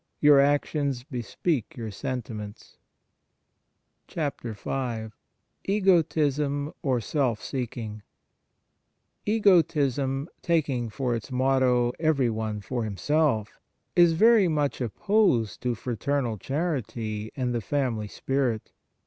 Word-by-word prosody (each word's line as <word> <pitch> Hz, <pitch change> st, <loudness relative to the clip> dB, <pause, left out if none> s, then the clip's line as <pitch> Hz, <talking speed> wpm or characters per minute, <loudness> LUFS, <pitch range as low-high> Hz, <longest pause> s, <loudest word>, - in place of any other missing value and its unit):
Your 145 Hz, -1 st, +7 dB
actions 140 Hz, -2 st, +1 dB
bespeak 140 Hz, -, -3 dB
your 110 Hz, -2 st, -5 dB
sentiments. 110 Hz, -3 st, -6 dB, 1.3 s
10 150 Hz, -4 st, -2 dB, 1.3 s
EGOTISM, 150 Hz, -7 st, +2 dB
OR 130 Hz, -4 st, +1 dB
SELF 120 Hz, -1 st, 0 dB
SEEKING 115 Hz, -5 st, -5 dB, 1.3 s
EGOTISM, 150 Hz, -, +2 dB
taking 140 Hz, -9 st, 0 dB
for 125 Hz, +2 st, -2 dB
its 115 Hz, +3 st, -5 dB
motto 125 Hz, -2 st, +2 dB
" -, -, -33 dB
Every 135 Hz, -6 st, +2 dB
one 110 Hz, -1 st, -3 dB
for 120 Hz, +3 st, -3 dB
himself," 110 Hz, +1 st, 0 dB, 0.4 s
is 175 Hz, -1 st, +6 dB
very 220 Hz, +2 st, +5 dB
much 150 Hz, -4 st, 0 dB
opposed 125 Hz, -, +1 dB
to 125 Hz, -1 st, 0 dB
fraternal 120 Hz, 0 st, -2 dB
charity 115 Hz, -, -3 dB
and 125 Hz, -2 st, -1 dB
the 120 Hz, -, -1 dB
family 115 Hz, -3 st, -1 dB
spirit. 130 Hz, -1 st, -2 dB
135 Hz, 100 wpm, -26 LUFS, 115-150 Hz, 1.3 s, Your